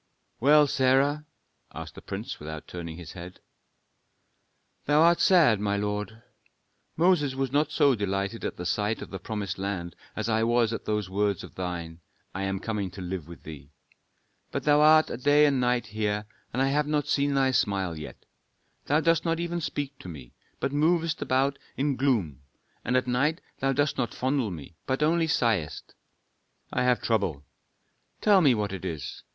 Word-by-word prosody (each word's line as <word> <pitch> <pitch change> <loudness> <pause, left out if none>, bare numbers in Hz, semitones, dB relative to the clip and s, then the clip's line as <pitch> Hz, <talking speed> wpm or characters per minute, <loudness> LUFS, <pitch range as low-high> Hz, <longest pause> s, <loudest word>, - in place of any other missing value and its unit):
"Well, 150 +4 +6
Sarah?" 140 +3 +2 0.5
asked - - -7
the - - -11
prince, - - -6
without 80 +1 -7
turning 85 -2 -7
his 85 -4 -9
head. 90 0 -10 1.5
"Thou 145 +1 +3
art 170 +2 +5
sad, 165 - +5
my 100 0 0
lord. 105 +2 -3 0.7
Moses 160 -5 +3
was 135 -1 -1
not 150 +2 +1
so 140 -2 +4
delighted 100 0 -2
at 90 - -4
sight 105 +3 -1
of - - -11
the 95 - -5
promised 100 -2 -4
land 95 -3 -4 0.2
as 110 0 -2
I 110 -1 +1
was 115 0 +2
at - - -5
those 105 -2 -1
words 100 0 0
of - - -11
thine: 85 -3 -5 0.3
'I 95 - -4
am 95 0 -2
coming 105 -2 -3
to 90 - -11
live 90 -3 -5
with 85 - -12
thee.' 75 -3 -10 0.8
But - - -3
thou 150 0 +4
art 155 +1 +6
a - - -3
day 145 +4 +5
and 140 -2 +2
a - - 0
night 125 -1 +1
here, 105 -1 -2 0.3
and 130 +3 +1
I 135 - +2
have 145 +1 +1
not 150 -2 0
seen 140 0 +1
thy 135 -1 +3
smile 100 -7 0
yet. 75 -1 -9 0.6
Thou 150 +3 +3
dost 165 0 +2
not 165 -1 0
even 170 0 -2
speak 145 -2 -4
to 90 - -9
me, 70 -7 -10 0.3
but - - -1
movest 160 +2 +1
about 135 +2 +1 0.2
in 140 0 +1
gloom, 110 - 0 0.4
and 125 - +1
at 130 - +1
night 140 +7 +1 0.2
thou 135 0 +1
dost 145 +1 0
not 120 - -2
fondle 130 -3 0
me, 85 -2 -8
but 130 +3 0
only 165 +1 +2
sighest." 110 - 0 0.8
"I - - +1
have 125 -1 +2
trouble." 95 -11 0 0.8
"Tell 205 -3 +5
me 140 -7 +5
what 105 -2 -2
it 95 - -6
is. 80 -7 -5
120 Hz, 180 wpm, -27 LUFS, 95-145 Hz, 1.5 s, Well